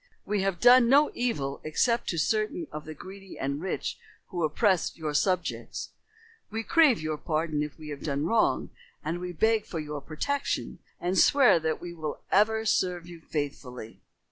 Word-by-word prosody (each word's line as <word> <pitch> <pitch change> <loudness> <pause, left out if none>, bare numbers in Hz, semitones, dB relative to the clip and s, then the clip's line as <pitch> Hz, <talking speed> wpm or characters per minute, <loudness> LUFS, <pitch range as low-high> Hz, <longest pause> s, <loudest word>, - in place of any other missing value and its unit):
We 205 -1 0
have 195 -2 -1
done 245 0 +7
no 290 +3 +5
evil 145 - -2
except 235 +10 +1
to 170 - -2
certain 215 0 0
of 150 0 -7
the 155 - -8
greedy 195 +4 -11
and 140 +2 -2
rich 190 - -3 0.3
who 175 -2 -2
oppressed 180 +4 +1
your 155 -2 -3
subjects. 180 +4 -1 0.6
We 225 +1 -3
crave 305 -3 +5
your 155 -1 -3
pardon 155 -1 -1
if 150 0 -4
we 155 -1 -9
have 145 -1 -6
done 145 0 -1
wrong, 220 +6 +1 0.3
and 175 - -2
we 180 0 -4
beg 220 +5 +2
for 170 - -5
your 150 -1 -5
protection, 275 - -2 0.2
and 180 +2 +1
swear 270 -11 +6
that 160 0 -1
we 175 -1 -7
will 155 -3 -5
ever 220 +2 +3
serve 180 -4 +1
you 175 -1 -11
faithfully." 135 -7 -5
175 Hz, 170 wpm, -28 LUFS, 155-215 Hz, 0.6 s, done